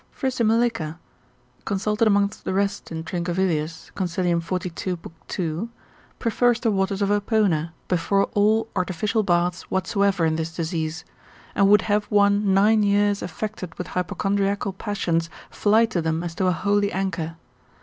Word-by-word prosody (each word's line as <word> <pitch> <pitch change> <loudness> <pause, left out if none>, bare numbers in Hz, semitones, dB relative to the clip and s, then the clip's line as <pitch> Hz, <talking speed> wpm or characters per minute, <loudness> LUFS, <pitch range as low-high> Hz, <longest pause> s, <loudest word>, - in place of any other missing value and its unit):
Frisimelica, 230 - 0 0.7
consulted 210 +3 +1
amongst 200 0 +1
the 190 - -2
rest 200 -1 -1
in 160 0 -4
Trincavelius, 170 -2 -2
consil. 175 -2 0
42. 180 +1 -3
lib. - - -10
2. 175 +5 -3 0.5
prefers 240 +1 +2
the 230 -2 +1
waters 195 0 0
of 200 - +1
Apona 205 -6 +1 0.2
before 195 +3 +2
all 215 +2 +3
artificial 195 +4 0
baths 175 -2 0
whatsoever 190 -1 +1
in 160 0 +1
this 160 0 -4
disease, 160 -1 -3 0.5
and 200 -1 +4
would 210 -1 +6
have 210 0 +1
one 205 -1 +3
nine 210 +3 +4
years 205 0 +2
affected 185 -2 -5
with 180 - -5
hypochondriacal 195 +2 -1
passions 175 -5 -1 0.2
fly 220 +2 +4
to 220 -6 -2
them 160 +1 -1
as 170 -1 -4
to 185 +2 0
a - - +4
holy 200 +3 +1
anchor. 170 -4 -2
195 Hz, 140 wpm, -24 LUFS, 170-205 Hz, 0.7 s, would